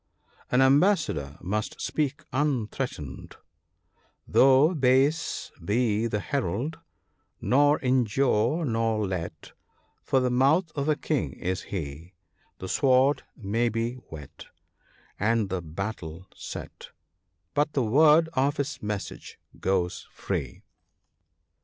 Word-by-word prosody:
An 125 Hz, -, +3 dB
ambassador 135 Hz, -, +2 dB
must 105 Hz, +4 st, -3 dB
speak 145 Hz, -2 st, -2 dB
unthreatened, 125 Hz, -, -2 dB, 0.3 s
— -, -, -48 dB
" -, -, -41 dB
Though 135 Hz, +5 st, +6 dB
base 140 Hz, +2 st, +1 dB
be 110 Hz, +3 st, +1 dB
the 105 Hz, -2 st, -1 dB
Herald, 130 Hz, -, -2 dB, 0.6 s
nor 145 Hz, +3 st, +4 dB
injure 130 Hz, +3 st, +2 dB
nor 115 Hz, -3 st, 0 dB
let, 85 Hz, -4 st, -5 dB, 0.5 s
For 135 Hz, -, +1 dB
the 125 Hz, -1 st, +1 dB
mouth 150 Hz, +7 st, +3 dB
of 145 Hz, +1 st, -2 dB
a 155 Hz, -, +3 dB
king 140 Hz, -, -2 dB
is 95 Hz, +2 st, -3 dB
he; 80 Hz, 0 st, -6 dB, 0.4 s
The 95 Hz, -, -7 dB
sword 130 Hz, +6 st, +3 dB, 0.2 s
may 115 Hz, +2 st, 0 dB
be 115 Hz, +2 st, -2 dB, 0.2 s
whet, 75 Hz, -3 st, -10 dB, 0.7 s
and 110 Hz, -1 st, +1 dB
the 95 Hz, -1 st, -1 dB
battle 85 Hz, 0 st, -6 dB
set, -, -, -8 dB, 0.6 s
But 150 Hz, +1 st, +1 dB
the 135 Hz, -, +1 dB
word 150 Hz, +7 st, +5 dB
of 140 Hz, +2 st, +1 dB
his 140 Hz, +1 st, -3 dB
message 105 Hz, -1 st, -5 dB, 0.2 s
goes 90 Hz, -2 st, -1 dB
free." -, -, -4 dB
120 Hz, 115 wpm, -27 LUFS, 95-140 Hz, 0.7 s, Though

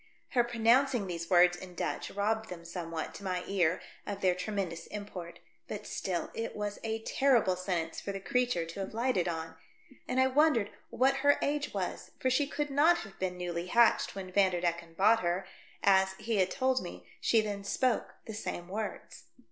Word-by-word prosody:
Her 245 Hz, -, +3 dB
pronouncing 240 Hz, 0 st, +3 dB
these 170 Hz, -2 st, -5 dB
words 175 Hz, -1 st, +6 dB
in 180 Hz, 0 st, -10 dB
Dutch -, -, -2 dB
rob 215 Hz, +2 st, 0 dB
bed 220 Hz, -, -15 dB
them 170 Hz, -2 st, -8 dB
somewhat, 165 Hz, -2 st, -5 dB
to -, -, -10 dB
my 180 Hz, -2 st, -2 dB
ear, 180 Hz, -3 st, +1 dB, 0.3 s
of 200 Hz, -1 st, -4 dB
their 185 Hz, -1 st, +4 dB
tremendous 180 Hz, -3 st, -3 dB
import, 180 Hz, -5 st, -7 dB, 0.3 s
but 210 Hz, 0 st, -6 dB
still 180 Hz, -3 st, -3 dB
it 230 Hz, -, -4 dB
was 205 Hz, -1 st, -3 dB
a 225 Hz, 0 st, -2 dB
terrible 240 Hz, -10 st, +3 dB
sentence 175 Hz, -3 st, -2 dB
for 200 Hz, -, -4 dB
the 195 Hz, -, -4 dB
creature 245 Hz, -6 st, 0 dB
to 165 Hz, +4 st, -8 dB
have 195 Hz, +1 st, -4 dB
lipfhted 230 Hz, -6 st, +1 dB
on, 160 Hz, 0 st, -6 dB, 0.5 s
and 255 Hz, -, 0 dB
I 260 Hz, -, +6 dB
wondered 265 Hz, -6 st, +3 dB, 0.2 s
what 270 Hz, +2 st, +2 dB
her 285 Hz, +1 st, +4 dB
age 295 Hz, 0 st, 0 dB
was, -, -, -3 dB
for 260 Hz, -, 0 dB
she 280 Hz, +3 st, +2 dB
could 295 Hz, 0 st, -2 dB
not 310 Hz, +5 st, +5 dB
have 195 Hz, -2 st, -11 dB
been 185 Hz, -1 st, -2 dB
newly 175 Hz, -1 st, -3 dB
hatched 235 Hz, +1 st, +4 dB
when 190 Hz, -1 st, -6 dB
Vanderdecken 175 Hz, -3 st, +1 dB
bought 215 Hz, +5 st, +5 dB
her, 175 Hz, +1 st, -1 dB, 0.4 s
as 190 Hz, -1 st, +4 dB
— -, -, -17 dB
he 220 Hz, 0 st, -1 dB
had 185 Hz, -1 st, +3 dB
told 260 Hz, +3 st, +1 dB
me 175 Hz, -, -8 dB
— -, -, -28 dB
she 230 Hz, -, +4 dB
then 205 Hz, -2 st, -2 dB
spoke 245 Hz, +4 st, 0 dB
the 220 Hz, -, -6 dB
same 180 Hz, -4 st, -5 dB
words. 210 Hz, +2 st, -5 dB
200 Hz, 195 wpm, -31 LUFS, 180-235 Hz, 0.5 s, words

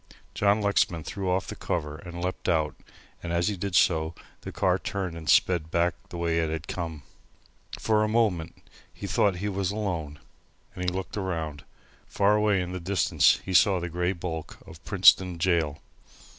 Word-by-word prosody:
John 100 Hz, +1 st, +2 dB
Lexman 95 Hz, -5 st, +1 dB
threw 95 Hz, +2 st, -4 dB
off 90 Hz, +1 st, +1 dB
the -, -, -7 dB
cover 75 Hz, -3 st, -3 dB
and 85 Hz, +2 st, -8 dB
leapt 90 Hz, +1 st, -3 dB
out 80 Hz, -3 st, +1 dB, 0.5 s
and 85 Hz, -, -5 dB
as 85 Hz, +4 st, +1 dB
he 105 Hz, -, -2 dB
did 95 Hz, 0 st, -3 dB
so 80 Hz, -2 st, +3 dB, 0.3 s
the -, -, -7 dB
car -, -, +1 dB
turned 95 Hz, -4 st, -4 dB
and 80 Hz, -3 st, -6 dB
sped 85 Hz, -4 st, +3 dB
back 85 Hz, +1 st, +1 dB, 0.2 s
the 85 Hz, -, -7 dB
way 85 Hz, -1 st, 0 dB
it 80 Hz, -1 st, 0 dB
had 80 Hz, 0 st, -4 dB
come. 80 Hz, -5 st, -5 dB, 0.7 s
For 110 Hz, -1 st, +2 dB
a -, -, +1 dB
moment 105 Hz, -8 st, 0 dB, 0.4 s
he -, -, -8 dB
thought 95 Hz, +1 st, +2 dB
he 95 Hz, +4 st, -3 dB
was 100 Hz, -2 st, -1 dB
alone, 90 Hz, -8 st, -3 dB, 0.6 s
and 90 Hz, 0 st, -1 dB
looked 95 Hz, +3 st, -5 dB
around. 80 Hz, -7 st, -4 dB, 0.4 s
Far 100 Hz, +1 st, +2 dB
away 105 Hz, -2 st, +2 dB
in 90 Hz, 0 st, -4 dB
the 90 Hz, -, -4 dB
distance 90 Hz, 0 st, +3 dB
he 95 Hz, -, -4 dB
saw 95 Hz, +1 st, +5 dB
the 90 Hz, 0 st, -4 dB
grey 90 Hz, +2 st, -1 dB
bulk 80 Hz, -3 st, -6 dB
of 80 Hz, +1 st, -13 dB
Princetown 90 Hz, -2 st, +5 dB
Gaol. 80 Hz, -4 st, +1 dB
90 Hz, 180 wpm, -27 LUFS, 80-95 Hz, 0.7 s, saw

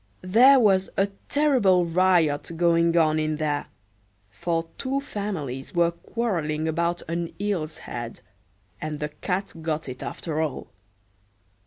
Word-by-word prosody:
There 250 Hz, +8 st, +7 dB
was 195 Hz, -4 st, +3 dB
a 195 Hz, +1 st, +2 dB, 0.2 s
terrible 245 Hz, -12 st, +3 dB
riot 170 Hz, -3 st, +2 dB
going 170 Hz, 0 st, +3 dB
on 155 Hz, -1 st, +3 dB
in 155 Hz, 0 st, 0 dB
there, 150 Hz, -1 st, -1 dB, 0.6 s
for 165 Hz, -, -2 dB
two 270 Hz, +1 st, -1 dB
families 190 Hz, -, -5 dB
were 170 Hz, 0 st, +3 dB
quarreling 170 Hz, -6 st, -2 dB
about 170 Hz, +2 st, -1 dB
an 170 Hz, 0 st, -3 dB
eel's 180 Hz, -7 st, -2 dB
head, 120 Hz, -1 st, -7 dB, 0.6 s
and 155 Hz, -1 st, -4 dB
the 150 Hz, -, -2 dB
cat 180 Hz, +6 st, -3 dB
got 160 Hz, -1 st, -2 dB
it 130 Hz, -1 st, -7 dB
after 160 Hz, -2 st, -3 dB
all. 155 Hz, -4 st, -4 dB
170 Hz, 130 wpm, -25 LUFS, 155-195 Hz, 0.6 s, There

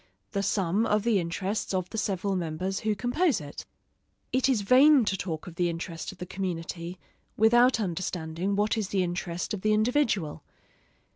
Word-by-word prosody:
The 200 Hz, -, -1 dB
sum 200 Hz, +2 st, +1 dB
of 210 Hz, -1 st, +2 dB
the 225 Hz, -4 st, +3 dB
interests 190 Hz, +4 st, -2 dB
of 185 Hz, -1 st, -2 dB
the 220 Hz, -, -5 dB
several 195 Hz, -1 st, -1 dB
members 180 Hz, +2 st, -2 dB
who 215 Hz, -1 st, 0 dB
compose 245 Hz, -, +1 dB
it. 145 Hz, -2 st, -9 dB, 0.7 s
It 260 Hz, +1 st, +3 dB
is 245 Hz, -6 st, +2 dB
vain 260 Hz, +5 st, +6 dB
to 195 Hz, -, 0 dB
talk 165 Hz, -4 st, -4 dB
of 170 Hz, -2 st, -10 dB
the 175 Hz, -1 st, +2 dB
interest 165 Hz, 0 st, -5 dB
of 195 Hz, -, -15 dB
the 180 Hz, -, -6 dB
community, 175 Hz, -1 st, -4 dB, 0.4 s
without 240 Hz, +3 st, +5 dB
understanding 180 Hz, -1 st, -2 dB
what 210 Hz, +2 st, +1 dB
is 210 Hz, -, -2 dB
the 190 Hz, -1 st, +1 dB
interest 175 Hz, 0 st, -3 dB
of 200 Hz, -, -4 dB
the 215 Hz, +1 st, +2 dB
individual. 215 Hz, -, +1 dB
195 Hz, 170 wpm, -28 LUFS, 175-220 Hz, 0.7 s, vain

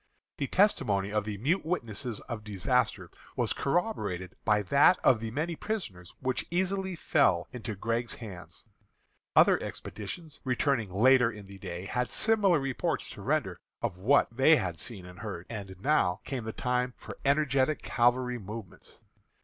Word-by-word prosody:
The 140 Hz, -, -1 dB
testimony 100 Hz, -, +2 dB
of 105 Hz, -1 st, 0 dB
the 105 Hz, -2 st, -4 dB
mute 150 Hz, -, +1 dB
witnesses 120 Hz, -, -3 dB
of 115 Hz, -4 st, -6 dB
disaster 100 Hz, -4 st, 0 dB, 0.2 s
was -, -, 0 dB
corroborated 105 Hz, -, -1 dB
by 105 Hz, -1 st, +3 dB
that 140 Hz, -, +5 dB
of 125 Hz, -4 st, +5 dB
the 115 Hz, 0 st, -4 dB
many 155 Hz, +8 st, -2 dB
prisoners 100 Hz, -, -5 dB
which 130 Hz, -1 st, -1 dB
easily 190 Hz, +1 st, -1 dB
fell 100 Hz, -, +2 dB
into 115 Hz, -3 st, -5 dB
Gregg's 115 Hz, +4 st, -2 dB
hands. 90 Hz, -6 st, -10 dB, 0.7 s
Other -, -, +6 dB
expeditions, 145 Hz, -, -7 dB
returning 125 Hz, -4 st, +1 dB
later 125 Hz, +5 st, +5 dB
in 105 Hz, -3 st, -10 dB
the 100 Hz, 0 st, -12 dB
day, 90 Hz, -1 st, -6 dB
had 125 Hz, +4 st, -1 dB
similar 205 Hz, -7 st, +3 dB
reports 135 Hz, -2 st, -2 dB
to -, -, -10 dB
render -, -, -1 dB, 0.2 s
of 90 Hz, -, -2 dB
what 135 Hz, +9 st, +4 dB
they 135 Hz, +5 st, +6 dB
had 90 Hz, -, -2 dB
seen 100 Hz, -7 st, -5 dB
and 90 Hz, 0 st, -12 dB
heard. 100 Hz, -5 st, -6 dB
And 100 Hz, -4 st, -6 dB
now 105 Hz, -7 st, +2 dB
came 130 Hz, -5 st, -4 dB
the 110 Hz, -, -3 dB
time 125 Hz, +1 st, -1 dB
for -, -, -10 dB
energetic 140 Hz, 0 st, +2 dB
cavalry 125 Hz, 0 st, +2 dB
movements. 105 Hz, -1 st, -9 dB
120 Hz, 155 wpm, -29 LUFS, 100-140 Hz, 0.7 s, Other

